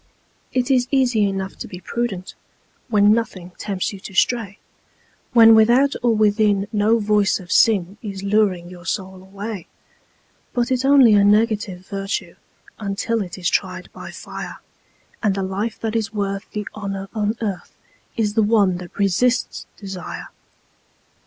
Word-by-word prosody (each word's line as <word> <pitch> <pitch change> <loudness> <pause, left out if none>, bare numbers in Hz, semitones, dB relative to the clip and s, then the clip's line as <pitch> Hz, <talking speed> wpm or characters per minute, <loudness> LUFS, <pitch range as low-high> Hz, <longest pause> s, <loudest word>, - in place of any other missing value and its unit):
It 255 +1 0
is 250 -2 +3
easy 245 -7 +2
enough 195 0 -4
to - - -7
be 180 - -9
prudent 195 -3 -4 0.5
When 210 -3 +5
nothing 195 -6 -3
tempts 195 -1 -2
you 195 - -8
to 190 - -10
stray, 215 -1 +1 0.8
When 225 -2 +8
without 240 +6 +5
or 240 -2 +2
within 210 -1 +2
no 215 +2 +3
voice 210 -2 +2
of 180 -1 -11
sin 200 -3 +3
Is 195 -3 -6
luring 200 -4 +1
your 175 0 -12
soul 190 -1 -4
away; 200 0 -7 0.9
But 240 +1 0
it's 255 0 +1
only 270 -5 +7
a 205 -1 +5
negative 210 -3 +2
virtue 195 0 -4 0.5
Until 215 +2 -1
it 180 -2 -6
is 180 -2 -2
tried - - -2
by - - -9
fire, - - -8 0.6
And 205 -4 +1
the 195 - -2
life 200 +4 -3
that 225 0 -2
is 225 -1 -1
worth 200 -1 -3
the 210 -1 -5
honour 195 -2 -5
on 215 0 0
earth 195 -6 -4 0.4
Is 210 -2 0
the 220 - +3
one 205 -4 +3
that 180 -1 -11
resists 205 +6 +1
desire. 190 -4 -7
205 Hz, 150 wpm, -21 LUFS, 195-225 Hz, 0.9 s, When